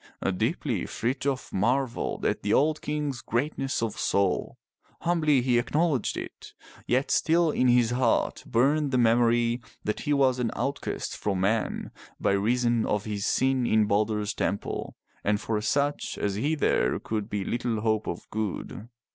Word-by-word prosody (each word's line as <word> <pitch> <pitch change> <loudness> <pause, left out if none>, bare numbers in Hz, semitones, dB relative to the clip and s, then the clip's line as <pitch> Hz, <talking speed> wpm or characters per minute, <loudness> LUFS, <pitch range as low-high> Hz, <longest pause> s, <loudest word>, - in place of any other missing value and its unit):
Deeply - - -1
Frithjof 130 +2 -2
marveled 120 +5 0
at - - 0
the 100 - -1
old 155 +5 +3
King's 145 -4 -3
greatness 135 +1 -1
of 115 - -3
soul, 100 -2 0 0.4
humbly 155 -6 +2
he 120 -2 +3
acknowledged 150 0 0
it, - - -8 0.3
yet 130 +3 +1
still 165 0 +3
in 130 - +2
his 120 -1 +4
heart 125 +1 +1
burned 145 +5 +2
the 130 - +1
memory 120 0 +3 0.2
that 105 - -2
he 150 - -2
was 135 -3 +3
an 120 -2 0
outcast 140 +1 -3
from 95 -3 -2
men 110 +4 0 0.3
by - - +1
reason 120 +3 +2
of 105 -1 -1
his 105 -2 -2
sin 130 -2 +2
in 110 -1 +4
Balder's 105 0 0
temple, 100 0 -3 0.3
and 105 0 +1
for 110 -1 -2
such 140 +6 0
as 100 - -1
he 145 +11 0
there 60 - +1
could 110 -1 -4
be 100 -2 -2
little 120 -2 -1
hope 110 -1 0
of - - -5
good. 110 +1 -4
120 Hz, 155 wpm, -27 LUFS, 105-135 Hz, 0.4 s, his